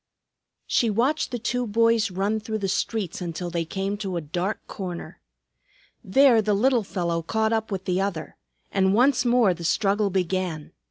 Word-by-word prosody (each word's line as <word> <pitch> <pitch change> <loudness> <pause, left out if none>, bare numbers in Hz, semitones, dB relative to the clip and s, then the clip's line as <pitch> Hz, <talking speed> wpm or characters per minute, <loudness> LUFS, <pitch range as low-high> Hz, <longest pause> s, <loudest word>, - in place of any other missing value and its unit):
She 235 - +2
watched 250 +9 +1
the 245 - -3
two 245 +1 -2
boys 230 0 +3
run 200 +4 -1
through 220 0 -4
the 200 -2 -2
streets 190 -1 -2
until 175 0 -4
they 165 -1 -1
came 195 +4 -3
to 195 -4 -3
a - - 0
dark 175 +6 -3
corner. 180 -4 -7 0.8
There 250 +2 +5
the 210 -1 +1
little 245 +3 +3
fellow 170 -4 -2
caught 220 +6 0
up 220 -1 -1
with 190 -1 -4
the 185 +1 0
other, 195 -5 -3 0.4
and 190 0 +2
once 255 +1 +3
more 240 -5 +4
the 170 0 -9
struggle 200 +4 +1
began. 180 -4 -2
200 Hz, 170 wpm, -25 LUFS, 180-225 Hz, 0.8 s, There